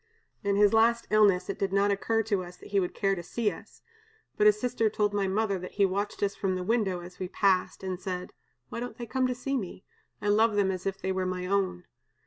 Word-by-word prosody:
In 200 0 +1
his 205 0 +5
last 230 +1 +4
illness 200 -4 +4
it 200 - -4
did 195 -1 0
not 200 +1 +3
occur 225 +3 +1
to 205 -3 0
us 180 0 -11
that - - -13
he 200 - +2
would 180 -2 -2
care 195 -1 +1
to 180 - -3
see 210 +5 -1
us, - - -13 0.5
but 210 - +4
his 210 0 +5
sister 235 -2 +1
told 210 -1 0
my 200 -1 +1
mother 200 0 0
that 185 - -8
he 200 - +3
watched 200 +2 -2
us 200 0 +1
from 190 -2 -1
the 185 - -3
window 195 -4 0
as 180 +1 -12
we 185 - -3
passed, 190 0 +1
and 185 -1 -3
said: 180 -1 -5 0.4
'Why - - -5
don't 245 +1 -6
they 240 - -5
come 255 +2 0
to 250 - -2
see 275 +3 -2
me? 190 -5 -5 0.4
I 205 - -1
love 215 +1 +4
them 200 -2 +2
as 185 0 -4
if 195 0 -3
they 190 - -2
were 185 -1 -1
my 180 0 -3
own.' 185 -2 0
200 Hz, 250 wpm, -28 LUFS, 185-215 Hz, 0.5 s, his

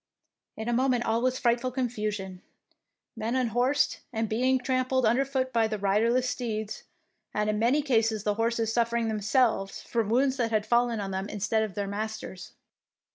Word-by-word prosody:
In 220 - -5
a 240 - +1
moment 250 -1 +2
all 225 +1 +1
was 255 +1 +1
frightful 240 +1 +1
90 250 - -15
THE 260 - +1
PEINCESS - - +3
WINS 215 -3 -2
confusion, 185 -1 -11 0.7
men 225 +2 -2
unhorsed 255 +3 +1
and 225 -2 -1
being 255 +5 +2
trampled 255 0 0
underfoot 260 +2 +1
by 225 -1 +3
the 215 -1 -3
riderless 225 +6 +2
steeds, 220 -4 -4 0.5
and 210 0 +1
in 210 - -2
many 255 +7 +3
cases 225 -6 +1
the 210 - +1
horses 225 0 0
suffering 235 -1 +1
themselves 215 -1 +1
from 230 -3 -1
wounds 260 +3 +2
that 235 -2 0
had 215 -2 0
fallen 235 -1 +2
on 195 -1 -4
them 190 +2 -3
instead 215 +2 0
of 215 -4 -3
their 205 - -1
masters. 210 -2 -5
230 Hz, 185 wpm, -28 LUFS, 215-250 Hz, 0.7 s, PEINCESS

